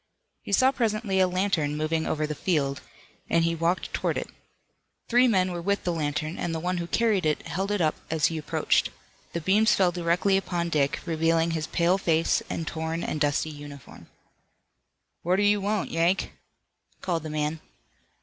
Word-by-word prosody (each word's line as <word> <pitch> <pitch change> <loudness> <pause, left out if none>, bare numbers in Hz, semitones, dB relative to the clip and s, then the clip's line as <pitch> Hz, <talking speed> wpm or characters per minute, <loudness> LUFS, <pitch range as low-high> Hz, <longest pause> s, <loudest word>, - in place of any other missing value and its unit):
He - - -8
saw 260 +6 +5
presently 215 -6 0
a 185 - +5
lantern 180 -5 0
moving 160 +1 -1
over 155 0 0
the 150 - -3
field, 145 -4 -1 0.5
and 165 0 +3
he 165 0 +1
walked 165 +2 -1
toward - - -1
it. - - -5 0.8
Three 245 +1 +5
men 185 -5 +2
were 175 -1 -4
with 200 +2 0
the 175 - 0
lantern, 155 +1 -2
and 165 -1 -2
the - - -2
one 180 +2 -1
who 170 -1 -3
carried 215 0 +1
it 155 -1 0
held 195 +3 -2
it 205 -2 0
up 155 -2 +2 0.2
as 155 -2 +1
he 165 -1 0
approached. 150 - +1 0.4
The 170 - -2
beams 210 +6 +4
fell 185 -2 +3
directly 175 +3 +1
upon 175 -3 -2
Dick, 140 -4 +1
revealing 165 0 +1
his 160 -1 -2
pale 175 +4 +2
face 165 -3 +2
and 165 - -3
torn 160 +1 -3
and 150 - -3
dusty 145 +1 +1
uniform. 145 -2 -11 1.1
"What 180 +2 +1
do 200 - +2
you 205 0 +3
want, 205 +1 -1
Yank?" 170 +3 +1 0.7
called 170 -3 -1
the 155 - -6
man. 150 +1 -2
170 Hz, 180 wpm, -26 LUFS, 155-190 Hz, 1.1 s, saw